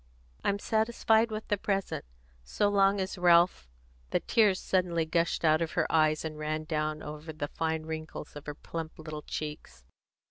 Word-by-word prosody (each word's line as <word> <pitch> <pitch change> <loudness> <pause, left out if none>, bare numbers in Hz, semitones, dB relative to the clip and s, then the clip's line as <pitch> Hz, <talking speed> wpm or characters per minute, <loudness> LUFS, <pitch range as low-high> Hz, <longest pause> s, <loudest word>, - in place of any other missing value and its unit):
"I'm 200 - +1
satisfied 220 +1 +2
with 215 0 -5
the 205 - +1
present, 195 - -2 0.4
so 205 - +1
long 200 0 +4
as 190 0 -3
Ralph 175 - +4 0.2
" - - -32
The - - +1
tears 210 -5 +3
suddenly 175 -3 +1
gushed 170 +1 0
out 155 +1 +4
of 165 - -2
her - - +2
eyes, 155 -1 +3
and 155 -1 -5
ran 155 +1 -2
down 155 -1 -2
over 150 +2 -7
the 150 -2 -4
fine 160 -1 -2
wrinkles 160 -1 -6
of 145 - -9
her 150 - -4
plump 165 +1 -6
little 155 -1 -7
cheeks. 150 - -6
160 Hz, 175 wpm, -30 LUFS, 155-195 Hz, 0.4 s, long